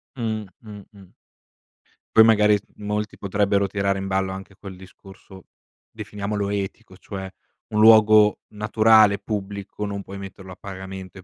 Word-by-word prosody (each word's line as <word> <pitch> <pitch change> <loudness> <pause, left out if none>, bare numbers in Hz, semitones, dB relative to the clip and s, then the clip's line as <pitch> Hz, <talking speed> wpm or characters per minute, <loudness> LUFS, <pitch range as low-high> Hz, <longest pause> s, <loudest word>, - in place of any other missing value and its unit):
Mh. 110 -4 -3 0.2
Mh. 105 -3 -11
Mh. 95 -3 -16 1.1
Poi, 110 - +9
magari, 105 -2 +4 0.2
molti 105 0 -4
potrebbero 100 0 0
tirare 100 0 -1
in 95 - -5
ballo 95 0 -1
anche 95 +1 -9
quel 95 0 -10
discorso, 95 0 -15 0.5
definiamolo 100 0 -4
etico, 95 -2 -5
cioè: 95 -1 -8 0.4
un 105 - -1
luogo 110 -1 +6
naturale 110 -1 +4
e - - -10
pubblico 100 0 -5
non 100 -1 -5
puoi 100 0 -10
metterlo 95 -1 -10
a - - -10
pagamento 95 -1 -9
e 95 - -14
100 Hz, 145 wpm, -23 LUFS, 95-105 Hz, 1.1 s, Poi